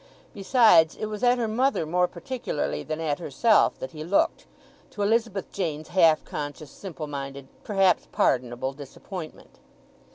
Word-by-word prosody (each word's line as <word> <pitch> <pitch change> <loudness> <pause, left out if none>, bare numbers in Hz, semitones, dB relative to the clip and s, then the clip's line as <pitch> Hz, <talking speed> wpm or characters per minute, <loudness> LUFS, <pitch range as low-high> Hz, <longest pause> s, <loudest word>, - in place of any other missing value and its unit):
Besides, 200 -6 +5
it - - -4
was 215 0 -6
at 245 0 +4
her 235 -2 -1
mother 250 -3 +1
more 180 +3 +2
particularly 180 - -4
than 155 0 -5
at 155 -2 -1
herself 205 - +3
that 130 - -7
he 155 -1 -7
looked, 180 +5 +1 0.4
to 205 - -4
Elizabeth 215 -2 0
Jane's 155 -4 -3
half 165 -4 +4
conscious, 145 -1 -6
simple 170 -5 -7
minded, 140 -2 -6 0.2
perhaps 195 -3 +2
pardonable, 125 +1 0
disappointment. 155 +5 -10
170 Hz, 140 wpm, -26 LUFS, 150-210 Hz, 0.4 s, Besides